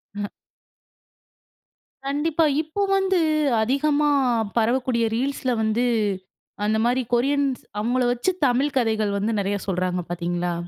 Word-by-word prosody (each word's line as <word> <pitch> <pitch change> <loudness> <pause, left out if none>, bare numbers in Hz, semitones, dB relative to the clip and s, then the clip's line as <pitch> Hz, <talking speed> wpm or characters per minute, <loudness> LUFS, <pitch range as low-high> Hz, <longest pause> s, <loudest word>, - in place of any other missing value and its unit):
அ, 205 0 -4 1.8
கண்டிப்பா. 310 +3 +1 0.2
இப்போ 320 +6 -4 0.2
வந்து 380 -2 +1 0.4
அதிகமா 290 +5 +1 0.5
பரவக்கூடிய 235 0 +1
ரீல்ஸ்ல 260 0 -1
வந்து 220 +3 +1 0.8
அந்தமாரி 235 +4 +1
கொரியன்ஸ் 275 +1 +1 0.2
அவுங்கள 245 +4 0
வச்சு, 245 +10 0 0.2
தமிழ் 270 +3 0
கதைகள் 220 -4 +1
வந்து 210 +3 -1
நெறையா 200 0 -1
சொல்றாங்க 180 -1 -1
பாத்தீங்களா? 175 0 -2
245 Hz, 100 wpm, -23 LUFS, 210-280 Hz, 1.8 s, கண்டிப்பா